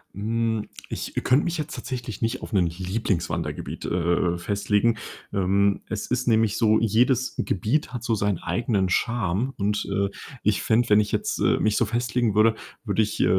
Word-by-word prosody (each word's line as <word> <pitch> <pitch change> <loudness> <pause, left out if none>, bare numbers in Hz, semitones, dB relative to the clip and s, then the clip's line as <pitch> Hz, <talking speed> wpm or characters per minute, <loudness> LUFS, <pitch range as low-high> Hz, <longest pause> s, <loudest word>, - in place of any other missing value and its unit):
Hm, 110 +1 -1 0.2
ich - - -5
könnte 130 +4 +4
mich 175 0 -2
jetzt 155 0 -4
tatsächlich 120 -5 -5
nicht 115 +3 -1
auf - - -8
'nen 90 -4 +3
Lieblings-Wandergebiet, 85 -4 -3
äh, 85 0 +1
äh, - - -5
festlegen. 105 +4 +1 0.4
Ähm, 100 +1 +2
es 110 -2 -3
ist 125 0 -1
nämlich 110 -2 +3
so, 110 -1 +4
jedes 120 +3 +2
Gebiet 115 - 0
hat 120 - -4
so 115 -1 +1
sein 100 -2 0
eigenen 110 -5 0
Charme. 115 +4 0
Und, 105 +1 0
äh, 100 0 +1 0.3
ich 105 -1 +1
fände, 115 +1 +2
wenn 105 0 +6
ich 105 - -3
jetzt, - - -1
äh, - - +3
mich 110 -1 +2
so - - +3
festlegen 120 0 0
würde, 110 +1 +4 0.3
würde 105 0 +1
ich, 105 0 -1
äh, - - +4
110 Hz, 180 wpm, -25 LUFS, 100-115 Hz, 0.4 s, wenn